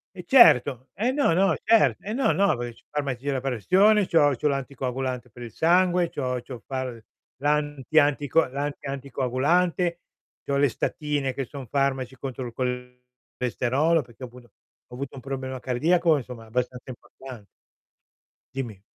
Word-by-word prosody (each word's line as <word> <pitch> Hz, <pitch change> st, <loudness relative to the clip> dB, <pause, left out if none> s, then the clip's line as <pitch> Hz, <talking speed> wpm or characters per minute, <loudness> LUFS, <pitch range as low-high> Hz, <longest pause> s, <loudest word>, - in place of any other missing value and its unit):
E 180 Hz, -, -8 dB
certo, 135 Hz, -, +5 dB
e 235 Hz, +7 st, 0 dB
no, 280 Hz, -, +2 dB
no 185 Hz, -1 st, +3 dB
cer 225 Hz, 0 st, +4 dB
eh, 210 Hz, -, -6 dB
no, 260 Hz, +4 st, +2 dB
no, 200 Hz, -9 st, +2 dB
perché 120 Hz, -1 st, -5 dB
c'ho -, -, -47 dB
farmaci 140 Hz, -4 st, -3 dB
della 140 Hz, -2 st, -1 dB
pressione, 185 Hz, -, +3 dB
c'ho 145 Hz, -4 st, +4 dB
c'ho 150 Hz, +5 st, 0 dB
l'anticoagulante 130 Hz, -2 st, -3 dB
per 120 Hz, +2 st, -11 dB
il 115 Hz, -, -9 dB
sangue, 175 Hz, +1 st, +3 dB
c'ho 125 Hz, -3 st, -3 dB
c'ho 125 Hz, 0 st, -9 dB
far 130 Hz, -4 st, -4 dB, 0.4 s
l'anti 145 Hz, +1 st, -1 dB
anti 145 Hz, -1 st, +3 dB
c 140 Hz, -, -21 dB, 0.2 s
l'anti 140 Hz, 0 st, -4 dB
anticoagulante, 140 Hz, +7 st, 0 dB, 0.5 s
c'ho 140 Hz, 0 st, 0 dB
le 145 Hz, 0 st, +4 dB
statine 145 Hz, +2 st, -2 dB
che 135 Hz, 0 st, -3 dB
son 135 Hz, 0 st, -9 dB
farmaci 135 Hz, -1 st, -1 dB
contro 130 Hz, -1 st, -5 dB
il 120 Hz, -, -6 dB, 0.9 s
colesterolo, 130 Hz, +7 st, +1 dB
perché 120 Hz, +1 st, -14 dB
appunto 120 Hz, -2 st, -15 dB, 0.4 s
ho 125 Hz, -, -16 dB
avuto 135 Hz, +1 st, -6 dB
un 130 Hz, -, -9 dB
problema 130 Hz, -1 st, -5 dB
cardiaco, 160 Hz, +6 st, +2 dB
insomma 125 Hz, -3 st, -8 dB
abbastanza 125 Hz, +3 st, -4 dB
importan 125 Hz, -2 st, -11 dB, 1.1 s
Dimmi. 115 Hz, -8 st, -5 dB
135 Hz, 150 wpm, -25 LUFS, 125-155 Hz, 1.1 s, certo